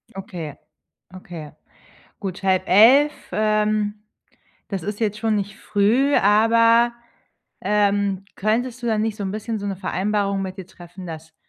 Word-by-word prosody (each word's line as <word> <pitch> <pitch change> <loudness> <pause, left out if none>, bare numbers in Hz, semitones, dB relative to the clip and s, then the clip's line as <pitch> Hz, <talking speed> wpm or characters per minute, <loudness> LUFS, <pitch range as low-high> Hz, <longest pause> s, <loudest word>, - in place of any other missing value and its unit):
Okay. 170 -6 -7 0.6
Okay. 170 -5 -9 0.7
Gut, 190 -2 -5
22:30, 220 +10 +5 0.2
ähm, 215 0 0 0.6
das 195 -4 -4
ist 205 +5 -5
jetzt 210 -2 -1
schon 220 -1 0
nicht 205 +1 -4
früh, 230 +8 +2
aber, 230 +3 +4 0.7
ähm, 200 -2 +1
könntest 240 +4 -1
du - - -3
dann 220 -2 +1
nicht 220 -1 -2
so 205 - -5
'n 190 - -2
bisschen 220 +1 -4
so 205 - -5
'ne 195 -1 -3
Vereinbarung 200 +1 -1
mit 190 -1 -5
ihr 190 - -7
treffen, 180 +1 -12
dass 160 -1 -9
205 Hz, 140 wpm, -22 LUFS, 190-220 Hz, 0.7 s, 22:30